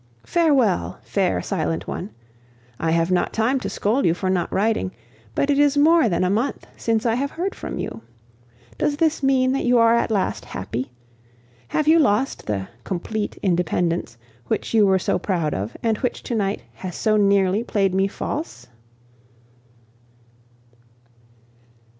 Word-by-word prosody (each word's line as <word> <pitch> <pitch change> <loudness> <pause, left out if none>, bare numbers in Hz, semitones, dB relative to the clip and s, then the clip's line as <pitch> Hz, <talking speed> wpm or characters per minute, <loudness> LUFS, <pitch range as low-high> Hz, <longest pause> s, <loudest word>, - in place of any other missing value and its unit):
Farewell, 280 - +2
fair 190 -3 0
silent 165 -4 -2
one. 190 - -5 0.7
I 165 - 0
have 165 +2 +1
not 180 - +1
time 245 +5 +1
to - - -4
scold 230 +7 0
you 165 - +3
for 185 +1 -1
not 180 -2 -1
writing, 215 -2 0 0.4
but 280 - +2
it 285 - +2
is 290 0 +4
more 315 -3 +5
than 180 0 +1
a - - +2
month 230 +7 -1
since 225 0 -1
I 230 - +3
have 275 +4 -1
heard 370 +6 -3
from - - -6
you! 115 - -5 0.8
Does 290 - 0
this 320 -1 +1
mean 260 -1 +3
that 270 - 0
you 245 0 +3
are 230 0 +5
at 235 - +2
last 205 -4 -1
happy? 115 +7 -5 0.8
Have 305 - -1
you 325 +1 +6
lost 260 -2 +1
the 95 -2 -2 0.2
"complete 205 +4 -3
independence" 175 - 0 0.3
which - - -2
you 215 -3 +5
were 190 0 +4
so 185 - 0
proud 170 -6 -1
of, 100 +5 -4
and 225 -2 +1
which 250 - -2
to - - -4
night 205 -3 -1
has 185 -2 -7
so 215 -1 +1
nearly 200 0 +3
played 195 -5 0
me 195 +1 +2
false? 200 - -5
210 Hz, 160 wpm, -22 LUFS, 180-260 Hz, 0.8 s, you